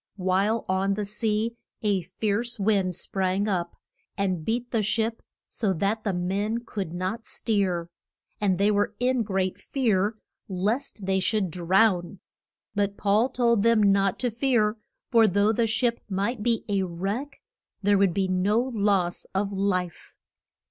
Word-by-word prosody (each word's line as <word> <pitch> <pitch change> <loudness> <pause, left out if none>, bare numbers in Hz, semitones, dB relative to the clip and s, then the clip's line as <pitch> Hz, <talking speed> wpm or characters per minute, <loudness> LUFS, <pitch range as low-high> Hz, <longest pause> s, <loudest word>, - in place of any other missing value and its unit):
While 195 +4 +1
on 190 +1 +1
the 210 0 -2
sea 215 +2 -1 0.3
a 200 -3 +2
fierce 215 +6 -2
wind 195 -3 +1
sprang 190 +3 -1
up, 175 -4 -1 0.4
and 185 -4 -1
beat 240 +6 -2
the 225 - +1
ship 220 +2 -1 0.3
so 205 -4 -1
that 200 +5 -1
the 205 - 0
men 200 +6 -1
could 195 -7 -4
not 185 +7 -4
steer. 190 -6 -1 0.5
And 195 -3 +1
they 200 +2 +3
were 205 +1 0
in 250 0 +2
great 190 -3 -1
fear 215 -5 0 0.3
lest 205 +3 -2
they 190 0 +1
should 195 -2 0
drown. 180 +1 +2 0.5
But 200 -1 -1
Paul 215 +5 +2
told 235 -4 +2
them 230 -1 +4
not 195 -1 +2
to 245 -2 +1
fear, 230 -3 +1 0.3
for 230 -2 +6
though 205 +2 +3
the 230 +1 +1
ship 235 +1 0
might 205 +4 -1
be 230 0 0
a 200 -2 +1
wreck 195 +11 -4 0.4
there 200 0 +4
would 195 -4 +3
be 195 -1 +1
no 185 +4 +2
loss 205 -8 0
of 200 +1 0
life. 185 -3 -2
205 Hz, 150 wpm, -26 LUFS, 190-225 Hz, 0.5 s, for